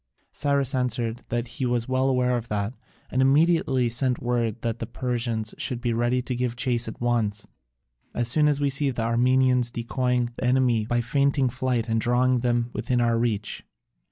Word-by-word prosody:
Cyrus 140 -1 0
answered 125 -3 0
that 120 0 -2
he 130 +2 -4
was 120 -1 0
well 130 +1 +1
aware 125 -1 +2
of 120 -1 -4
that, 105 +1 -2 0.4
and 130 - +1
immediately 135 -2 +3
sent 120 +2 0
word 120 -2 -1
that 115 0 -2
the 115 - -4
Persians 120 -3 -3
should 125 - -1
be 120 -1 -1
ready 120 +2 0
to 125 - -3
give 125 -1 -2
chase 120 -1 0
at 110 - -7
once, 115 -4 -1 0.7
"as 120 -1 0
soon 150 +5 +3
as 145 -1 +1
we 145 - +1
see 135 +1 +2
the 120 -3 -2
Armenians 125 +1 +3
decoying 125 0 -1
the - - -5
enemy 125 -4 +2
by 120 0 +1
feigning 140 +1 +1
flight 120 -2 -1
and 115 -1 0
drawing 125 +1 +2
them 120 0 0
within 120 +3 -1
our 115 -1 +2
reach." 110 -3 -2
120 Hz, 185 wpm, -25 LUFS, 115-130 Hz, 0.7 s, immediately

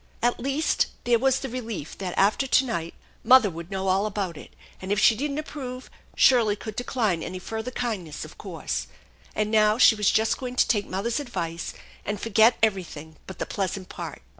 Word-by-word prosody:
At 240 0 +2
least, 275 +5 +1 0.2
there 240 -1 +3
was 265 +1 +2
the 270 - -3
relief 230 - -6
that 185 -2 -4
after 210 +7 +3
to 265 - +4
night 170 -8 -4 0.3
mother 255 -6 +6
would 165 +1 -8
know 195 -1 -3
all 195 +3 +2
about 195 -4 -3
it; - - -11 0.3
and, 190 +1 -5
if 205 - +2
she 220 - +6
didn't 280 +4 -3
approve, 260 -4 -6 0.2
Shirley 230 -5 +5
could 215 0 -8
decline 220 -8 -1
any 185 - -5
further 220 +6 -5
kindness, 205 -13 -4
of 155 - -13
course. 140 - -4 0.5
And 215 0 0
now 215 0 +4
she 250 - +7
was 210 -2 +2
just 220 +1 +2
going 250 -1 -5
to - - +3
take 205 -4 +1
mother's 220 +8 -2
advice 175 - -4 0.3
and 205 0 -3
forget 225 +2 +4
everything 170 -7 -1
but 190 - -8
the - - -3
pleasant 190 -1 -3
part. - - -7
215 Hz, 190 wpm, -25 LUFS, 185-245 Hz, 0.5 s, she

